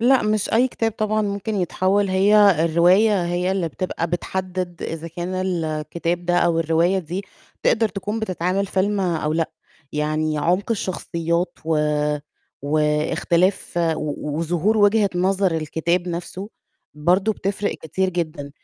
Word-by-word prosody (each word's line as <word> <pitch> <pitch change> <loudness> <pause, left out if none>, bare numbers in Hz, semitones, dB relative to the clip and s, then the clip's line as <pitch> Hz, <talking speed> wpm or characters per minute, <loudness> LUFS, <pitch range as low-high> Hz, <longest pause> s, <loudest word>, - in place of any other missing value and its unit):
لأ، 255 +3 +4
مش 215 -1 0
أي 245 +3 +4
كتاب 225 -3 -1
طبعًا 215 0 0
ممكن 200 +1 -3
يتحوّل 195 +1 +1
هي 195 -3 +5
الرواية 180 +4 +4
هي 175 +1 0
اللي 190 -3 0
بتبقى 170 +1 -3
بتحدِّد 180 0 -3
إذا 165 0 -5
كان 175 +2 -5
الكتاب 170 -1 -2
ده 175 - +2
أو 170 -1 +2
الرواية 165 +4 +2
دي 185 +3 -5 0.4
تقدر 225 -1 +3
تكون 205 +3 -4
بتتعمل 185 -1 -1
فيلم 200 +2 0
أو 165 -5 0
لأ. 165 0 0 0.4
يعني 155 0 -1
عُمق 180 +8 0
الشخصيات 170 -4 -2
و 160 -1 +1 0.8
واختلاف 155 +5 +1 0.2
و 150 0 -4
وظهور 175 +6 +1
وجهة 205 0 +4
نظر 185 0 +2
الكتاب 170 +3 -1
نَفْسه 175 +3 -5 0.5
برضه 180 +8 +2
بتفرِق 200 0 -2
كتير 190 +4 -2
جدًا. 160 -5 -4
180 Hz, 130 wpm, -22 LUFS, 165-200 Hz, 0.8 s, هي